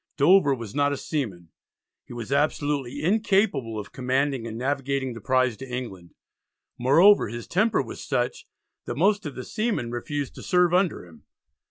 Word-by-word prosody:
Dover 145 Hz, -1 st, +5 dB
was 115 Hz, -4 st, -8 dB
not 145 Hz, 0 st, +2 dB
a 145 Hz, -, -2 dB
seaman; 100 Hz, -, -4 dB, 0.6 s
he -, -, -15 dB
was 120 Hz, +1 st, -7 dB
absolutely 145 Hz, -1 st, 0 dB
incapable 190 Hz, -, +1 dB
of 105 Hz, -, -7 dB
commanding 130 Hz, -1 st, -1 dB
and 110 Hz, 0 st, -6 dB
navigating 135 Hz, 0 st, -1 dB
the 115 Hz, -, -9 dB
prize 130 Hz, 0 st, +2 dB
to 135 Hz, 0 st, -9 dB
England. 100 Hz, -9 st, -7 dB, 0.6 s
Moreover 165 Hz, -, +5 dB
his 120 Hz, +1 st, -6 dB
temper 215 Hz, +5 st, +2 dB
was -, -, -8 dB
such 480 Hz, -, -2 dB, 0.4 s
that -, -, -5 dB
most 200 Hz, -4 st, +2 dB
of 145 Hz, -, -8 dB
the 130 Hz, -, -6 dB
seamen 215 Hz, -, -2 dB
refused 140 Hz, +3 st, -4 dB
to -, -, -10 dB
serve 180 Hz, -1 st, +2 dB
under 180 Hz, -, +1 dB
him. 85 Hz, -2 st, -18 dB
140 Hz, 165 wpm, -25 LUFS, 120-165 Hz, 0.6 s, Dover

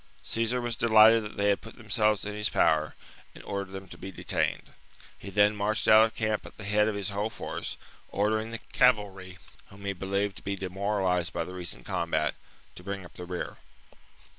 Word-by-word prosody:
Caesar 115 Hz, +2 st, 0 dB
was 120 Hz, -1 st, -2 dB
delighted 110 Hz, 0 st, +6 dB
that 105 Hz, -1 st, -8 dB
they 100 Hz, 0 st, +2 dB
had 100 Hz, -, +2 dB
put 110 Hz, -, -11 dB
themselves 110 Hz, -3 st, +1 dB
in 105 Hz, -, -4 dB
his 105 Hz, 0 st, -1 dB
power, 75 Hz, -1 st, +2 dB, 0.4 s
and -, -, -11 dB
ordered 100 Hz, -1 st, -4 dB
them 95 Hz, 0 st, -7 dB
to -, -, -12 dB
be 95 Hz, -, -7 dB
detained: -, -, -1 dB, 0.4 s
he 100 Hz, -, -9 dB
then 105 Hz, +1 st, +4 dB
marched 105 Hz, +1 st, 0 dB
out 110 Hz, +1 st, +8 dB
of 110 Hz, -, -15 dB
camp 110 Hz, -1 st, -1 dB
at -, -, -13 dB
the 110 Hz, -, -8 dB
head 105 Hz, +1 st, +3 dB
of 110 Hz, -, -1 dB
his 100 Hz, 0 st, -2 dB
whole 100 Hz, +2 st, -1 dB
force, -, -, -5 dB, 0.3 s
ordering 110 Hz, +2 st, 0 dB
the 115 Hz, -, -4 dB, 0.2 s
cavalry, 100 Hz, -7 st, +2 dB, 0.3 s
whom 100 Hz, 0 st, -13 dB
he 100 Hz, -, -1 dB
believed 100 Hz, +2 st, -2 dB
to -, -, -11 dB
be 100 Hz, -, -2 dB
demoralized 95 Hz, -2 st, -1 dB
by 85 Hz, -, -1 dB
the 90 Hz, -, -8 dB
recent 90 Hz, -1 st, -5 dB
combat, 80 Hz, -2 st, 0 dB, 0.4 s
to -, -, -11 dB
bring 100 Hz, -1 st, -5 dB
up -, -, -14 dB
the 90 Hz, -, -8 dB
rear. 90 Hz, 0 st, -5 dB
100 Hz, 200 wpm, -28 LUFS, 95-110 Hz, 0.4 s, out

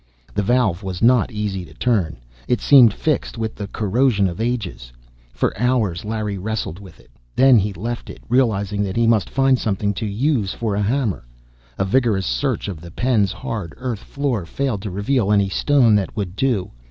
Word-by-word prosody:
The 100 Hz, -, 0 dB
valve 105 Hz, -4 st, +1 dB
was 95 Hz, 0 st, -5 dB
not 125 Hz, 0 st, +4 dB
easy 105 Hz, -4 st, -3 dB
to -, -, -14 dB
turn; 105 Hz, -, 0 dB, 0.3 s
it 125 Hz, -, +1 dB
seemed 130 Hz, -6 st, +7 dB
fixed 150 Hz, +2 st, -2 dB
with 110 Hz, -1 st, -3 dB
the 100 Hz, -, -6 dB
corrosion 105 Hz, 0 st, +1 dB
of 90 Hz, +3 st, -5 dB
ages. 110 Hz, -, -3 dB, 0.4 s
For -, -, -1 dB
hours 110 Hz, -7 st, 0 dB
Larry 105 Hz, -2 st, -3 dB
wrestled 105 Hz, -3 st, -3 dB
with 95 Hz, -3 st, -14 dB
it. 60 Hz, -, -22 dB, 0.2 s
Then 130 Hz, -3 st, +6 dB
he 105 Hz, +1 st, -1 dB
left 115 Hz, +6 st, -5 dB
it, -, -, -9 dB
realizing 105 Hz, -5 st, +1 dB
that 95 Hz, -2 st, -2 dB
he 115 Hz, -, +3 dB
must 115 Hz, -3 st, +2 dB
find 135 Hz, -1 st, +2 dB
something 100 Hz, -1 st, -1 dB
to 105 Hz, -, -4 dB
use 110 Hz, -1 st, 0 dB
for 110 Hz, -3 st, -2 dB
a 100 Hz, -, 0 dB
hammer. 110 Hz, -, -1 dB, 0.5 s
A 95 Hz, -, 0 dB
vigorous 105 Hz, -3 st, +1 dB
search -, -, -1 dB
of 90 Hz, -6 st, -6 dB
the 85 Hz, -, -10 dB
pen's 105 Hz, 0 st, +1 dB
hard 100 Hz, -7 st, -5 dB
earth 125 Hz, -4 st, -4 dB
floor 135 Hz, -8 st, -2 dB
failed 115 Hz, +3 st, -2 dB
to 105 Hz, -, -5 dB
reveal 100 Hz, +3 st, 0 dB
any 100 Hz, -2 st, +3 dB
stone 130 Hz, 0 st, +3 dB
that 100 Hz, +2 st, -3 dB
would 95 Hz, -3 st, -3 dB
do. 115 Hz, -6 st, 0 dB
105 Hz, 190 wpm, -21 LUFS, 95-125 Hz, 0.5 s, seemed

